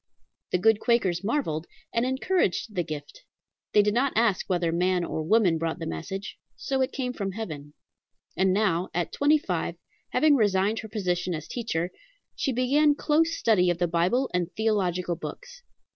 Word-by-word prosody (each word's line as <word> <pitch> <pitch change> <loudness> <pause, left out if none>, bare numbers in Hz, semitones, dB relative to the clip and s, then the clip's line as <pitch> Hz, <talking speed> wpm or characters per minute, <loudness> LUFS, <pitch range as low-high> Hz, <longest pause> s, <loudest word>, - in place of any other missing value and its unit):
The - - +3
good 220 +3 +4
Quakers 200 -8 +1
marvelled, 195 - -1 0.3
and 235 +2 +1
encouraged 260 - 0
the 180 - 0
"gift." 150 -3 -7 0.5
They 210 - +5
did 210 0 +1
not 260 +4 +1
ask 220 -5 +2
whether 175 -2 +1
man 180 +1 +1
or 160 - -3
woman 175 -1 +3
brought 165 0 -2
the - - -5
message, 190 - -5 0.2
so 270 -1 -2
it 260 - 0
came 250 -2 -3
from 195 -5 -4
heaven. 150 -9 -7 0.6
And 190 0 +2
now, 185 -3 +1
at 175 -1 -1
twenty 295 +2 +4
five, 305 - -3 0.3
having 310 -2 +4
resigned 205 -2 +2
her 220 - -7
position 180 -4 -1
as 155 0 -7
teacher, 180 -8 -2 0.4
she 270 - -1
began 285 +4 +3
close 325 +3 +1
study 185 -6 +3
of 175 - +1
the 175 0 +1
Bible 180 +11 +1
and 180 -1 -1
theological 185 -5 0
books. - - -9
200 Hz, 170 wpm, -26 LUFS, 175-245 Hz, 0.6 s, They